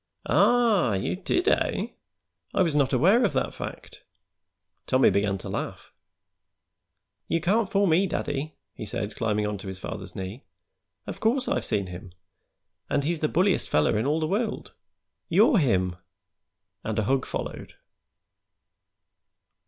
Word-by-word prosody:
"Ah! 225 Hz, -, +3 dB
You 95 Hz, -, -1 dB
did, 350 Hz, -, -1 dB
eh? -, -, +1 dB, 0.7 s
I 190 Hz, -, +4 dB
was 165 Hz, -4 st, 0 dB
not 145 Hz, -3 st, +2 dB
aware 190 Hz, -, +4 dB
of 205 Hz, -, +1 dB
that -, -, -1 dB
fact." -, -, -8 dB, 0.9 s
Tommy 130 Hz, +1 st, +4 dB
began 100 Hz, -1 st, +1 dB
to -, -, -8 dB
laugh. -, -, -5 dB, 1.3 s
"You 165 Hz, -, +1 dB
can't 195 Hz, +5 st, +1 dB
fool 200 Hz, +1 st, +2 dB
me, 185 Hz, +2 st, +3 dB
daddy," 145 Hz, -2 st, -3 dB, 0.2 s
he -, -, -8 dB
said, 110 Hz, 0 st, -4 dB
climbing 105 Hz, -2 st, 0 dB
onto 105 Hz, -1 st, -4 dB
his 95 Hz, -1 st, -5 dB
father's 95 Hz, -, -7 dB
knee. 95 Hz, +7 st, -6 dB, 0.6 s
"Of -, -, -7 dB
course 250 Hz, +4 st, +1 dB
I've -, -, 0 dB
seen 100 Hz, -, 0 dB
him, 90 Hz, 0 st, -9 dB, 0.8 s
and 145 Hz, -, +1 dB
he's 165 Hz, +2 st, -1 dB
the 155 Hz, -, 0 dB
bulliest 185 Hz, +2 st, +1 dB
feller 75 Hz, +7 st, +2 dB
in 110 Hz, +5 st, 0 dB
all 150 Hz, +2 st, +1 dB
the 160 Hz, -, 0 dB
world. 210 Hz, +7 st, -2 dB, 0.6 s
You're 235 Hz, -, +5 dB
him!" 95 Hz, -, +1 dB, 0.9 s
And 110 Hz, -1 st, -3 dB
a 110 Hz, -, +2 dB
hug 130 Hz, +4 st, 0 dB
followed. -, -, -6 dB
145 Hz, 145 wpm, -26 LUFS, -, 1.3 s, You're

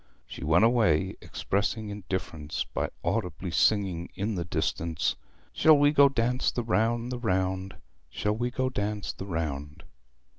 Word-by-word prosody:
She -, -, -9 dB
went 80 Hz, +8 st, +4 dB
away, 110 Hz, -10 st, +3 dB
expressing 105 Hz, +2 st, -2 dB
indifference 85 Hz, -6 st, -4 dB
by -, -, -3 dB
audibly 90 Hz, -2 st, -2 dB
singing 95 Hz, -2 st, +2 dB
in 105 Hz, +3 st, -2 dB
the 90 Hz, -3 st, -2 dB
distance 85 Hz, -1 st, -1 dB, 0.4 s
'Shall 155 Hz, -1 st, +6 dB
we 145 Hz, 0 st, +5 dB
go 140 Hz, -1 st, +6 dB
dance 125 Hz, -1 st, +1 dB
the 120 Hz, -, -2 dB
round, 115 Hz, +2 st, +1 dB
the 125 Hz, -, -3 dB
round, 95 Hz, -3 st, -1 dB
the -, -, -18 dB
round, -, -, -22 dB, 0.3 s
Shall 105 Hz, 0 st, -1 dB
we 120 Hz, +2 st, -1 dB
go 130 Hz, +1 st, -1 dB
dance 105 Hz, -2 st, -2 dB
the 95 Hz, -, -8 dB
round?' 75 Hz, -4 st, -4 dB
100 Hz, 155 wpm, -28 LUFS, 85-115 Hz, 0.4 s, Shall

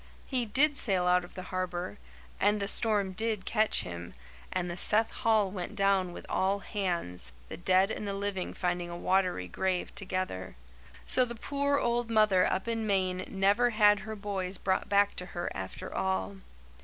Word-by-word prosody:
He 250 Hz, -3 st, -1 dB
did 280 Hz, +7 st, +3 dB
sail 190 Hz, -9 st, +1 dB
out 180 Hz, 0 st, +3 dB
of 175 Hz, -, -13 dB
the 185 Hz, -, -6 dB
harbour; 180 Hz, -, -3 dB, 0.4 s
and 205 Hz, +1 st, +3 dB
the 200 Hz, -, -2 dB
storm 205 Hz, -2 st, +3 dB
did 215 Hz, 0 st, -2 dB
catch 215 Hz, -1 st, +2 dB
him, 85 Hz, -3 st, -7 dB, 0.4 s
and 180 Hz, -1 st, -1 dB
the 175 Hz, -, -4 dB
Seth 215 Hz, +5 st, +4 dB
Hall 215 Hz, -4 st, +2 dB
went 190 Hz, +2 st, -5 dB
down 195 Hz, -3 st, +2 dB
with -, -, -9 dB
all 195 Hz, +1 st, +1 dB
hands, 175 Hz, -, -2 dB, 0.2 s
the -, -, -6 dB
dead 185 Hz, +3 st, +3 dB
and 210 Hz, -, -4 dB
the 200 Hz, -, -2 dB
living 195 Hz, -2 st, -3 dB
finding 175 Hz, -1 st, -1 dB
a 170 Hz, -, -6 dB
watery 180 Hz, -, +1 dB
grave 185 Hz, -, -2 dB
together. 185 Hz, -, -3 dB, 0.5 s
So 255 Hz, -, +4 dB
the 240 Hz, -1 st, -4 dB
poor 280 Hz, +4 st, 0 dB
old 240 Hz, -2 st, 0 dB
mother 215 Hz, -5 st, +4 dB
up 190 Hz, -, -2 dB
in 225 Hz, -1 st, -1 dB
Maine 185 Hz, -2 st, 0 dB
never 200 Hz, +5 st, +2 dB
had 210 Hz, -2 st, +5 dB
her 215 Hz, +3 st, -6 dB
boys 195 Hz, -2 st, -4 dB
brought 190 Hz, 0 st, -1 dB
back 200 Hz, 0 st, +3 dB
to 180 Hz, -, -2 dB
her 175 Hz, -, -2 dB
after 95 Hz, 0 st, -6 dB
all. 95 Hz, +1 st, -1 dB
195 Hz, 180 wpm, -30 LUFS, 180-215 Hz, 0.5 s, had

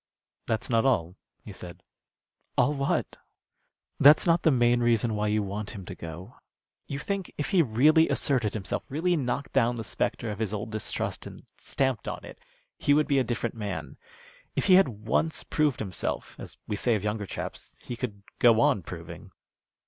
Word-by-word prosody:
"That's 110 Hz, -1 st, -1 dB
not 115 Hz, -2 st, +2 dB
all," 90 Hz, -10 st, +1 dB, 0.3 s
he 105 Hz, -, -8 dB
said. 90 Hz, -2 st, -10 dB, 0.7 s
"All 145 Hz, -, +4 dB
what?" 140 Hz, -1 st, -1 dB, 0.8 s
"That's 145 Hz, +2 st, +7 dB
not 170 Hz, -1 st, +3 dB
the -, -, +4 dB
main 120 Hz, -3 st, +3 dB
reason 120 Hz, -1 st, +2 dB
why 105 Hz, 0 st, 0 dB
you 105 Hz, 0 st, +1 dB
want 100 Hz, +1 st, -5 dB
him 95 Hz, -3 st, -8 dB
to -, -, -7 dB
go. 85 Hz, +7 st, -9 dB, 0.5 s
You 140 Hz, -, -4 dB
think 195 Hz, +4 st, -3 dB
if 145 Hz, -, -2 dB
he 190 Hz, -4 st, +5 dB
really 155 Hz, +6 st, +4 dB
asserted 125 Hz, -8 st, +1 dB
himself, 100 Hz, -4 st, -3 dB
really 175 Hz, +6 st, +1 dB
knocked 140 Hz, -1 st, -2 dB
down 120 Hz, -2 st, +3 dB
the 115 Hz, -, -4 dB
spectre 110 Hz, +1 st, -2 dB
of 105 Hz, -, -6 dB
his 110 Hz, -2 st, -1 dB
old 105 Hz, +1 st, -5 dB
distrust 110 Hz, -1 st, -3 dB
and -, -, -11 dB, 0.2 s
stamped 130 Hz, -6 st, -1 dB
on -, -, -5 dB
it, -, -, -12 dB, 0.4 s
he 145 Hz, -, +3 dB
would 150 Hz, 0 st, +3 dB
be 140 Hz, -3 st, +3 dB
a -, -, +3 dB
different 120 Hz, -1 st, -2 dB
man. 105 Hz, -4 st, -5 dB, 0.6 s
If -, -, 0 dB
he 190 Hz, -, +5 dB
had 190 Hz, -3 st, +7 dB
once 115 Hz, +9 st, -1 dB
proved 150 Hz, -5 st, +1 dB
himself, 95 Hz, -4 st, -4 dB
as -, -, -9 dB
we 105 Hz, -, -2 dB
say 115 Hz, +3 st, +1 dB
of 105 Hz, -, -3 dB
younger 105 Hz, -1 st, -2 dB
chaps, -, -, -7 dB
he 120 Hz, -, -5 dB
could 105 Hz, -5 st, -5 dB, 0.2 s
go 115 Hz, -2 st, +6 dB
on 105 Hz, -, +3 dB
proving." -, -, -9 dB
120 Hz, 185 wpm, -27 LUFS, 105-140 Hz, 0.8 s, That's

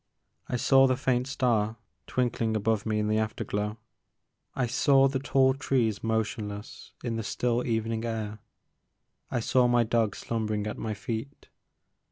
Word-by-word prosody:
I -, -, -1 dB
saw 135 Hz, +2 st, +5 dB
the 130 Hz, -1 st, +1 dB
faint 130 Hz, -1 st, +1 dB
star 115 Hz, -5 st, +1 dB, 0.3 s
twinkling 120 Hz, -3 st, 0 dB
above 110 Hz, 0 st, 0 dB
me 110 Hz, -1 st, +1 dB
in 105 Hz, 0 st, 0 dB
the 110 Hz, 0 st, +2 dB
afterglow, 105 Hz, -1 st, -2 dB, 0.8 s
I 130 Hz, -, +1 dB
saw 135 Hz, +3 st, +4 dB
the 135 Hz, 0 st, -1 dB
tall 130 Hz, -1 st, +3 dB
trees 120 Hz, -6 st, 0 dB
motionless 110 Hz, -2 st, -3 dB
in 115 Hz, -2 st, -2 dB
the 115 Hz, -, -3 dB
still 120 Hz, +3 st, 0 dB
evening 115 Hz, 0 st, -1 dB
air, 110 Hz, -2 st, -3 dB, 0.9 s
I 120 Hz, -, -1 dB
saw 125 Hz, +2 st, +3 dB
my 120 Hz, -1 st, +4 dB
dog 115 Hz, -2 st, +1 dB
slumbering 110 Hz, -2 st, -2 dB
at 105 Hz, -, -4 dB
my 110 Hz, -1 st, -3 dB
feet. 115 Hz, +6 st, -6 dB
115 Hz, 150 wpm, -28 LUFS, 110-125 Hz, 0.9 s, saw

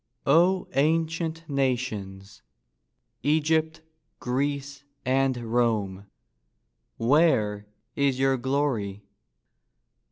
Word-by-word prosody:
O 180 Hz, +3 st, +3 dB
ancient 165 Hz, +2 st, 0 dB
nations—Egypt, 135 Hz, -, -3 dB, 0.4 s
Greece, 140 Hz, +2 st, -2 dB, 0.2 s
and 130 Hz, 0 st, +2 dB
Rome— 110 Hz, -5 st, -1 dB, 0.9 s
Where 115 Hz, -6 st, +2 dB, 0.3 s
is 140 Hz, -2 st, +1 dB
your 135 Hz, 0 st, +2 dB
glory? 125 Hz, -7 st, -1 dB
135 Hz, 60 wpm, -26 LUFS, 115-155 Hz, 0.9 s, O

